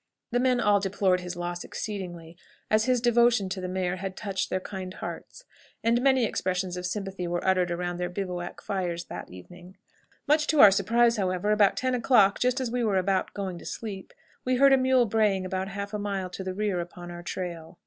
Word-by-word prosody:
The 245 - +2
men 250 -1 +2
all 205 -3 +4
deplored 190 -1 +1
his 180 -1 -6
loss 175 0 -4
exceedingly, 175 -5 -6 0.4
as 215 0 +3
his 255 -2 +2
devotion 235 -4 +3
to 185 0 -4
the 185 - -3
mare 185 0 -2
had 190 0 -6
touched 195 -2 -3
their 185 - 0
kind 185 -1 -7
hearts, - - -8 0.4
and 230 +2 +3
many 265 -2 +4
expressions 185 -3 -2
of 180 0 -3
sympathy 195 -2 -4
were 175 0 -2
uttered 185 -2 +3
around 175 0 -3
their 180 0 -2
bivouac 180 -2 -5
fires 175 -3 -2
on - - -4
that - - -7
evening. 175 - -13 0.5
Much 300 +1 +3
to 310 - +2
our 205 - +10
surprise, 230 +4 +3
however, 185 +1 0
about 210 -2 +4
ten 255 0 0
o'clock, 230 -5 +4
just 250 +1 +1
as 255 -3 -2
we 245 0 0
were 205 -4 +1
about 190 0 0
going 190 -3 -4
to - - -13
sleep, 200 -4 -6 0.3
we 255 0 +1
heard 275 +2 +6
a - - +8
mule 255 -1 +3
braying 205 -3 +1
about 185 +1 -2
half 200 +1 -6
a 210 - -2
mile 195 -3 -3
to 190 - -6
the 185 0 -4
rear 205 -3 -1
upon 175 0 -7
our 175 0 -8
trail. 175 -1 -6
195 Hz, 210 wpm, -27 LUFS, 180-225 Hz, 0.5 s, our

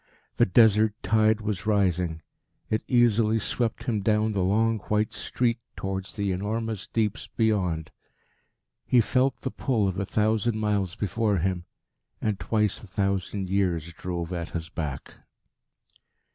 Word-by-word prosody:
The - - +4
desert 110 0 +5
tide 110 +2 +3
was 105 0 -3
rising. 90 -6 +1 0.5
It 110 - +1
easily 115 -3 +3
swept 115 +1 -1
him 110 -4 -1
down 110 +2 +2
the 100 -2 0
long 110 +4 +2
white 105 +2 +1
street 115 +2 -1 0.2
towards 95 -1 -4
the 100 -2 -1
enormous 105 +2 -3
deeps 110 -1 -1
beyond. 90 -8 0 0.9
He 125 - +3
felt 130 +3 +2
the 130 - -3
pull 110 -7 0
of 95 0 -2
a 100 - -1
thousand 110 +1 +1
miles 105 -4 0
before 105 0 0
him; 90 0 -1 0.5
and 105 -3 -1
twice 105 -3 0
a 110 - -12
thousand 95 0 -1
years 90 -4 0
drove 85 0 -4
at 85 -1 -4
his 80 0 -7
back. 75 -5 -5
105 Hz, 140 wpm, -26 LUFS, 95-110 Hz, 0.9 s, desert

